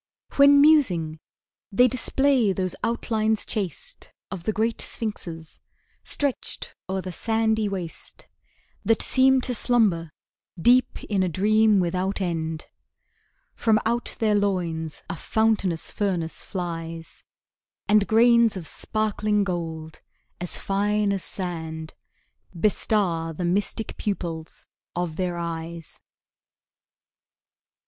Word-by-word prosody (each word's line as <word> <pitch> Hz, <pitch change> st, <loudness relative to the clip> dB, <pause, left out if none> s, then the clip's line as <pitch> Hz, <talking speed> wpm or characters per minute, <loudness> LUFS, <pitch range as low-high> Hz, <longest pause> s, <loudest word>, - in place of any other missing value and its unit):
When 280 Hz, 0 st, +8 dB
musing, 180 Hz, -, +4 dB, 0.5 s
they 245 Hz, +6 st, +5 dB
display 255 Hz, -2 st, +2 dB
those 185 Hz, -1 st, -2 dB
outlines 220 Hz, -1 st, 0 dB
chaste, 215 Hz, -, -5 dB, 0.2 s
Of 180 Hz, -3 st, -6 dB
the -, -, +2 dB
great 220 Hz, +2 st, 0 dB
sphinxes 170 Hz, -8 st, -5 dB, 0.4 s
stretched 285 Hz, -3 st, -3 dB, 0.2 s
o'er 190 Hz, 0 st, -1 dB
the 185 Hz, -, -6 dB
sandy 220 Hz, +2 st, 0 dB
waste, 180 Hz, -4 st, -6 dB, 0.6 s
That 225 Hz, -, +2 dB
seem 265 Hz, 0 st, +4 dB
to 250 Hz, -, -2 dB
slumber 210 Hz, -9 st, +2 dB, 0.5 s
deep 245 Hz, +7 st, +3 dB
in 200 Hz, -3 st, 0 dB
a 185 Hz, -, +1 dB
dream 215 Hz, +3 st, +3 dB
without 185 Hz, +3 st, -1 dB
end: 165 Hz, -4 st, -2 dB, 0.9 s
From 220 Hz, -2 st, +2 dB
out 235 Hz, +2 st, -1 dB
their 215 Hz, -2 st, +2 dB
loins 175 Hz, -6 st, -1 dB
a -, -, -4 dB
fountainous 205 Hz, -3 st, 0 dB
furnace 180 Hz, -6 st, -2 dB
flies, 165 Hz, -3 st, -6 dB, 0.6 s
And 210 Hz, -1 st, +4 dB
grains 235 Hz, -1 st, +5 dB
of 175 Hz, -, -6 dB
sparkling 210 Hz, +2 st, -1 dB
gold, 160 Hz, -4 st, -5 dB, 0.4 s
as 180 Hz, -, -4 dB
fine 205 Hz, +1 st, 0 dB
as 195 Hz, -, -3 dB
sand, 160 Hz, -4 st, -5 dB, 0.7 s
Bestar 175 Hz, -5 st, +1 dB
the 175 Hz, +3 st, -3 dB
mystic 200 Hz, +5 st, -1 dB
pupils 170 Hz, -6 st, -4 dB, 0.3 s
of 175 Hz, -2 st, -2 dB
their 180 Hz, -2 st, -1 dB
eyes. 165 Hz, -1 st, -6 dB
195 Hz, 110 wpm, -25 LUFS, 170-220 Hz, 0.9 s, When